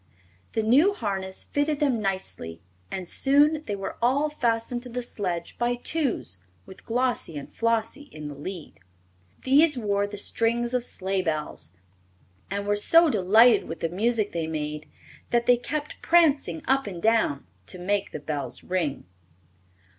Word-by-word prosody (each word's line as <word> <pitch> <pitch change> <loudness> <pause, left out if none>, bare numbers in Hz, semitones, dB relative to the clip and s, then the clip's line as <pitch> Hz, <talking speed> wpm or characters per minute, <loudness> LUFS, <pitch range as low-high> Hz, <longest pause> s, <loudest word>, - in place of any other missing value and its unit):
The 220 - 0
new 285 - +5
harness 190 - -3
fitted 290 0 -1
them 265 -7 +1
nicely 95 - -3 0.3
and 185 - -5
soon 290 - +3
they 205 - -1
were 195 -1 -6
all 280 +5 +2
fastened 240 -3 -1
to 250 - -9
the 250 +1 -4
sledge 180 -7 -4
by 240 0 +1
twos, 245 - -1 0.3
with 190 - -14
Glossie 245 -9 -1
and 140 - -7
Flossie 230 +5 -1
in 155 -1 -7
the 145 - -6
lead. 160 - -8 0.6
These 290 +2 +5
wore 205 -3 0
the 205 0 -8
strings 235 +3 +1
of 250 -1 +1
sleigh 190 -4 -1
bells, 150 - -3 0.7
and 200 +1 -3
were 205 0 +2
so 330 +9 +5
delighted 215 +3 +5
with 165 - -7
the 165 - 0
music 215 +3 0
they 165 -2 -2
made 150 -1 -4 0.4
that 235 0 +2
they 245 - +6
kept 290 +5 -5
prancing 295 - +3
up 270 -2 +2
and 180 -4 -6
down 220 -9 +2 0.2
to - - -1
make 200 +3 -1
the - - -6
bells 145 -3 -4
ring. 175 -6 -2
220 Hz, 155 wpm, -26 LUFS, 180-250 Hz, 0.7 s, they